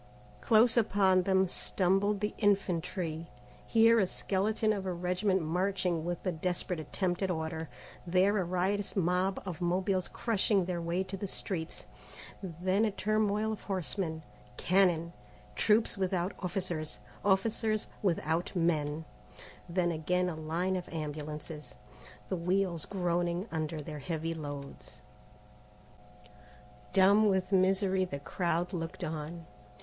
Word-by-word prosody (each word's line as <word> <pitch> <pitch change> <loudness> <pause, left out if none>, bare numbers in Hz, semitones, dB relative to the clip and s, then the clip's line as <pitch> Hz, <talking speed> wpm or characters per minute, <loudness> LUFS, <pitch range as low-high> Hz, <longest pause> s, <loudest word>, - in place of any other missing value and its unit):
Close 225 +1 +5
upon 195 -4 +4
them 190 +1 +3
stumbled 195 +3 +1
the 210 - -1
infantry; 175 -5 0 0.4
here 230 0 +6
a 195 - +3
skeleton 215 +4 0
of 195 -2 -4
a - - 0
regiment 180 +2 0
marching 180 0 0
with 175 +2 -4
a 185 - +2
desperate 175 +1 -2
attempt 175 +3 -2
at 190 - +1
order, 160 -2 -3 0.4
there 190 +4 +3
a - - +1
riotous 185 +3 -1
mob 185 +1 +1
of 180 -2 -5
Mobiles 185 +1 +1
crushing 205 -4 +1
their 175 -1 -2
way 170 +3 0
to 190 +1 -6
the 195 +1 -4
streets, 165 - -4 0.6
then 185 +3 0
a 220 - +3
turmoil 215 +1 +1
of 215 - -7
horsemen, 180 -4 -3 0.3
cannon, 175 -3 +3 0.4
troops 215 -1 +3
without, 185 0 0
officers, 175 -4 -2 0.3
officers 215 +2 +1 0.2
without 175 -2 0
men, 160 -2 0 0.6
then 175 0 +1
again 180 +3 0
a 170 - -4
line 165 +4 -1
of 180 -1 -4
ambulances, 150 -1 -6 0.5
the - - -1
wheels 180 -1 0
groaning 175 0 -1
under 155 -1 -3
their 150 0 -6
heavy 165 +2 -2
loads. 145 -3 -8 1.9
Dumb 200 +2 +5
with 190 -1 0
misery 190 0 +3
the 160 -6 -3
crowd 170 +4 -1
looked 165 -1 -4
on. 160 +2 -5
180 Hz, 125 wpm, -31 LUFS, 165-195 Hz, 1.9 s, here